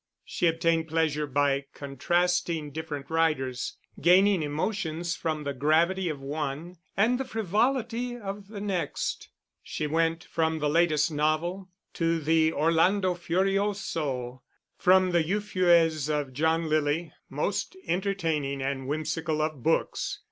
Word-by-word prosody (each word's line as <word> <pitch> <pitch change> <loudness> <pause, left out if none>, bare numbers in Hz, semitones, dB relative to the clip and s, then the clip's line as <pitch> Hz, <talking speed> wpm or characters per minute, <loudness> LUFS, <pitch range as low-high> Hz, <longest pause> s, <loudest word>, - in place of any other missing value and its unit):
She 175 - 0
obtained 165 0 +1
pleasure 155 -2 0
by 140 0 +1
contrasting 165 +2 0
different 150 -1 -6
writers, 135 -6 0 0.2
gaining 185 +3 +5
emotions 165 +2 -2
from 155 -2 -3
the 140 -1 -3
gravity 165 +7 +2
of 150 -3 -4
one 150 +4 -4 0.2
and 235 +5 +3
the - - 0
frivolity 240 +2 -1
of 200 -2 -7
the 205 -1 -8
next. 195 -4 -3 0.3
She 155 - -4
went 165 +2 0
from 160 -1 -1
the 150 -1 0
latest 160 -2 +3
novel 160 +5 -1 0.2
to 165 0 0
the 160 +1 +3
Orlando 175 +5 +2
Furioso, 175 -8 -1 0.3
from 185 0 +4
the 170 -1 +3
Euphues 170 -5 +2
of 145 -3 -1
John 160 +4 +1
Lyly 155 +1 0 0.2
(most - - -2
entertaining 165 -7 -1
and 135 -1 -3
whimsical 155 +2 -2
of 155 -3 -2
books!) 160 +6 0
165 Hz, 125 wpm, -27 LUFS, 150-185 Hz, 0.3 s, gaining